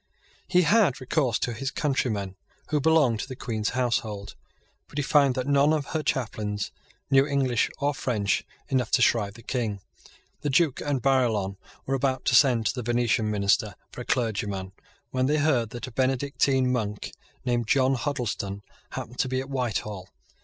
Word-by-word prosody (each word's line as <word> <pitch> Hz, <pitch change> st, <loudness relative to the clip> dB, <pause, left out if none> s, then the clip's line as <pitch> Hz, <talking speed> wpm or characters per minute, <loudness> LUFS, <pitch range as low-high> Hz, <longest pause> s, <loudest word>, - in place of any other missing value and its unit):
He 180 Hz, -1 st, +4 dB
had 195 Hz, -, +3 dB
recourse 130 Hz, -2 st, +1 dB
to 120 Hz, -, -2 dB
his 135 Hz, +4 st, -3 dB
countrymen 110 Hz, -, -1 dB, 0.3 s
who 150 Hz, -2 st, +1 dB
belonged 145 Hz, -7 st, +3 dB
to -, -, -4 dB
the 130 Hz, -, -7 dB
Queen's 110 Hz, -4 st, -2 dB
household; 110 Hz, -5 st, -1 dB, 0.5 s
but -, -, -12 dB
he 145 Hz, -, +1 dB
found 140 Hz, -2 st, +4 dB
that 130 Hz, -, -1 dB
none 140 Hz, +1 st, +4 dB
of 150 Hz, -3 st, 0 dB
her 160 Hz, -, 0 dB
chaplains 105 Hz, -7 st, -2 dB, 0.4 s
knew 135 Hz, +1 st, +5 dB
English 135 Hz, -5 st, +1 dB
or 145 Hz, +1 st, 0 dB
French 105 Hz, -8 st, 0 dB, 0.2 s
enough 125 Hz, -4 st, 0 dB
to 125 Hz, -, +5 dB
shrive 105 Hz, -4 st, +2 dB
the 115 Hz, -, -13 dB
King. 110 Hz, -6 st, -2 dB, 0.6 s
The 145 Hz, -, -2 dB
Duke 140 Hz, 0 st, +2 dB
and 140 Hz, -4 st, -1 dB
Barillon 115 Hz, -8 st, +2 dB, 0.3 s
were 135 Hz, -, -2 dB
about 135 Hz, -1 st, 0 dB
to 125 Hz, -, +3 dB
send 120 Hz, -4 st, +5 dB
to -, -, +2 dB
the 125 Hz, -, -4 dB
Venetian 120 Hz, -1 st, +1 dB
Minister 100 Hz, -2 st, +1 dB, 0.2 s
for -, -, -8 dB
a -, -, -7 dB
clergyman 100 Hz, -5 st, -1 dB, 0.4 s
when 130 Hz, 0 st, +1 dB
they 150 Hz, +2 st, +2 dB
heard 140 Hz, -7 st, +2 dB
that 120 Hz, +1 st, -6 dB
a 130 Hz, -, -9 dB
Benedictine 130 Hz, 0 st, +1 dB
monk, 105 Hz, -4 st, -2 dB, 0.3 s
named 120 Hz, -2 st, 0 dB
John 135 Hz, +1 st, +3 dB
Huddleston, 120 Hz, -7 st, -3 dB, 0.3 s
happened 125 Hz, -, -6 dB
to 130 Hz, -, +1 dB
be 130 Hz, 0 st, 0 dB
at 135 Hz, +1 st, -6 dB
Whitehall. 105 Hz, -7 st, -3 dB
125 Hz, 175 wpm, -26 LUFS, 110-135 Hz, 0.6 s, knew